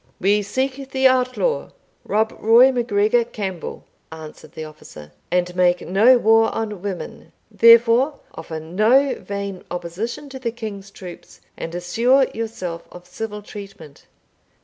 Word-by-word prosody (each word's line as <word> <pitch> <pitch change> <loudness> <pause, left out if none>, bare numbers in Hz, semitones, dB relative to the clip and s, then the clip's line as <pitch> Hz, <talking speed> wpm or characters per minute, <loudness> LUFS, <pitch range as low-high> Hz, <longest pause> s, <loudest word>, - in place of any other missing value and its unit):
"We 205 +2 +2
seek 265 +6 -3
the 265 0 +3
outlaw, 255 - 0 0.4
Rob 220 +1 0
Roy 235 +4 +6
MacGregor 235 -1 +1
Campbell," 195 -6 -6 0.3
answered 160 -1 -11
the 160 - -7
officer, 75 - -13 0.2
"and 180 +1 0
make 180 -1 +2
no 220 +8 +5
war 225 -1 +4
on 210 -4 -4
women; 195 -2 -7 0.2
therefore 235 +5 +5
offer 160 0 -7
no 215 - +2
vain 200 -2 -6
opposition 195 - -5
to 265 -1 -8
the 245 -2 -2
king's 215 -4 -7
troops, 185 -3 -12 0.2
and 165 +1 -6
assure 235 +10 +2
yourself 185 -7 -5
of 175 0 -12
civil 210 +3 -7
treatment." 195 -8 -12
210 Hz, 130 wpm, -21 LUFS, 180-240 Hz, 0.4 s, Roy